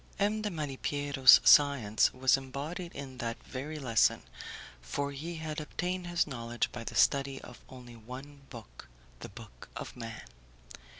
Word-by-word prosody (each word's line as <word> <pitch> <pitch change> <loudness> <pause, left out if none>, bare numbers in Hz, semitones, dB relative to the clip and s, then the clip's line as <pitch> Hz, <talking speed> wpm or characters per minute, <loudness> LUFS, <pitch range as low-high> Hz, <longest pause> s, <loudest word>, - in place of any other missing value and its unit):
M. 210 +2 0
de 210 - -2
Malipiero's 145 -4 +4
science 135 -8 +5
was 130 0 +3
embodied 145 +7 -6
in 130 -2 -8
that 115 -1 -3
very 145 +4 -6
lesson, 125 -6 +2 0.6
for 140 - -3
he 160 +5 -6
had 155 -1 -5
obtained 180 +3 -4
his 175 0 +1
knowledge 120 -4 -3
by 120 - -7
the - - -7
study 140 -1 +2
of 125 - -12
only 125 -2 -12
one 130 +5 -11
book 115 -5 -12 0.3
the - - -8
book 110 +1 -13
of - - -7
man. 115 -6 -8
135 Hz, 145 wpm, -30 LUFS, 120-150 Hz, 0.6 s, science